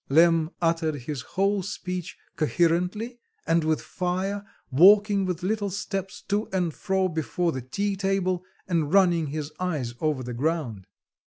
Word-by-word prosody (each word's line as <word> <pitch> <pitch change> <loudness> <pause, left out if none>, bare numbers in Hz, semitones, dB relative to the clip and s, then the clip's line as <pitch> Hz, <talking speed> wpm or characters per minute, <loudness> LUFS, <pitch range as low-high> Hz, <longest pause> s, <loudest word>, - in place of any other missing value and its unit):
Lemm 165 +2 +5
uttered 165 -2 +1
this 145 -3 -3
whole 195 +8 0
speech 180 -2 -5 0.2
coherently, 180 +9 0 0.3
and 165 0 +2
with 155 0 0
fire, 190 +3 -2 0.3
walking 200 +6 +6
with 180 -1 -3
little 205 +1 0
steps 195 -1 -4
to 210 +1 -1
and 180 -4 0
fro 190 +1 0
before 170 +1 -1
the 130 - -4
tea 200 +11 -2
table, 190 -2 0 0.2
and 165 -5 0
running 175 -5 +4
his 150 +1 -4
eyes 150 -10 -2
over 150 -4 0
the 125 0 -5
ground. 130 - -2
180 Hz, 145 wpm, -26 LUFS, 155-195 Hz, 0.3 s, walking